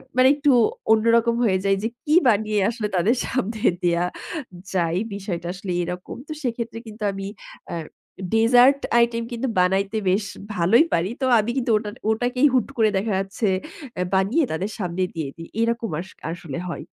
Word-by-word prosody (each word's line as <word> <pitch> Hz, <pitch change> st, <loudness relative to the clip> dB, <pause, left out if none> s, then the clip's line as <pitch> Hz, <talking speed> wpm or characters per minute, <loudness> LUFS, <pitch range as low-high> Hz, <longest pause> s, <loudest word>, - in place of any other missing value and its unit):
মানে 255 Hz, 0 st, +6 dB
একটু 290 Hz, 0 st, +2 dB, 0.4 s
অন্যরকম 230 Hz, +1 st, +4 dB
হয়ে 190 Hz, -4 st, +3 dB
যায় 195 Hz, 0 st, +3 dB
যে, 225 Hz, -, +1 dB, 0.2 s
কি 305 Hz, +1 st, +3 dB
বানিয়ে 215 Hz, -2 st, +2 dB
আসলে 225 Hz, -2 st, -3 dB
তাদের 200 Hz, +8 st, +3 dB
সামনে 225 Hz, -4 st, -2 dB, 0.2 s
দেওয়া 175 Hz, 0 st, +2 dB, 0.7 s
যায়? 170 Hz, -2 st, +1 dB, 0.2 s
বিষয়টা 175 Hz, -4 st, -4 dB
আসলে 190 Hz, 0 st, -6 dB
এরকম। 180 Hz, +1 st, -6 dB
তো -, -, -8 dB
সেক্ষেত্রে 235 Hz, -2 st, -3 dB
কিন্তু 215 Hz, 0 st, -8 dB
আমি 195 Hz, 0 st, -6 dB, 0.5 s
আ -, -, -2 dB, 0.6 s
ডেজার্ট 245 Hz, +5 st, +6 dB, 0.2 s
আইটেম 235 Hz, 0 st, +2 dB
কিন্তু 240 Hz, +3 st, -2 dB
বানাইতে 195 Hz, +3 st, +2 dB
বেশ 195 Hz, +3 st, +2 dB, 0.3 s
ভালোই 205 Hz, -, +4 dB
পারি। 170 Hz, +3 st, +1 dB
তো -, -, +2 dB
আমি 215 Hz, +3 st, 0 dB
কিন্তু 250 Hz, -2 st, 0 dB
ওটা 210 Hz, -1 st, -4 dB, 0.2 s
ওটাকেই 245 Hz, +5 st, +2 dB
হুট 255 Hz, -4 st, +2 dB
করে 220 Hz, -2 st, +4 dB
দেখা 210 Hz, +3 st, -1 dB
যাচ্ছে 195 Hz, +3 st, -2 dB, 0.5 s
এ -, -, +2 dB
বানিয়ে 205 Hz, +12 st, +2 dB
তাদের 185 Hz, +7 st, -2 dB
সামনে 180 Hz, -1 st, -1 dB
দিয়ে 160 Hz, -4 st, -3 dB
দিই। 165 Hz, 0 st, -10 dB
এরকম 230 Hz, 0 st, 0 dB
আস 180 Hz, -, -6 dB, 0.2 s
আসলে 170 Hz, -4 st, -6 dB
হয়। 175 Hz, -, -5 dB
215 Hz, 165 wpm, -23 LUFS, 185-235 Hz, 0.7 s, মানে